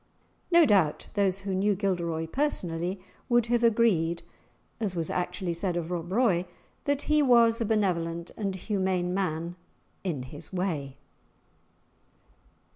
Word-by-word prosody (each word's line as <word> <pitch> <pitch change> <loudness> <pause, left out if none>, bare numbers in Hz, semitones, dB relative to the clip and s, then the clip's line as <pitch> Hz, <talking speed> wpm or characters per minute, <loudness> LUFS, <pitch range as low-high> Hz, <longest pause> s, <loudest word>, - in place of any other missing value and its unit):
[#] - - -40
Makes. 340 - +7
No - - +7
doubt 190 - +2
those 195 -2 +2
who 195 -1 -3
knew 200 +2 +2
Gilderoy 170 -5 -1
personally 180 - -1 0.3
would 240 -2 +4
have 240 0 +2
agreed, 200 -8 +3 0.6
as 205 -5 -1
was 165 -2 -2
actually 180 0 -2
said 175 +1 -1
of 170 0 -3
Rob 175 0 -3
Roy, 190 -6 +2 0.4
that 285 0 0
he 305 0 +3
was 235 -3 +5
a - - +1
benevolent 170 -6 0
and 195 -3 -2
humane 185 -2 -1
man 175 -2 -2 0.5
"in 160 -9 -2
his 145 +5 -10
way." 160 -8 -2
185 Hz, 140 wpm, -28 LUFS, 170-215 Hz, 0.6 s, Makes